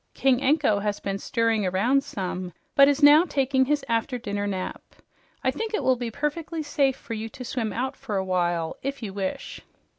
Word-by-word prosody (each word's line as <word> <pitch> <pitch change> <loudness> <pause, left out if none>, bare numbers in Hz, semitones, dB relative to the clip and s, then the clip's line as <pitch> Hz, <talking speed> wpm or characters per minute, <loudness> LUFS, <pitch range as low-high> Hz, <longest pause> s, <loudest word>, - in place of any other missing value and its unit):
King 265 -1 +2
Anko 275 -6 +3
has 205 0 -2
been 195 0 -3
stirring 230 -2 +1
around 215 +9 +2
some, 185 -4 -5 0.2
but 275 0 +7
is 285 +1 +1
now 295 +3 +8
taking 270 -5 +1
his 295 +1 0
after 230 +2 0
dinner 205 -4 -3
nap. 190 -2 -4 0.6
I - - +2
think 445 -1 -3
it - - -2
will 260 - +4
be 240 -1 -4
perfectly 310 +5 -3
safe 280 -2 +1
for 230 - -8
you 220 0 -4
to 250 +3 -9
swim 230 -3 -2
out 260 +6 -2
for 220 -7 -4
a 190 - -1
while, 175 -3 0
if 275 -1 -4
you 200 -3 -5
wish." 195 -1 -4
245 Hz, 200 wpm, -25 LUFS, 200-275 Hz, 0.6 s, now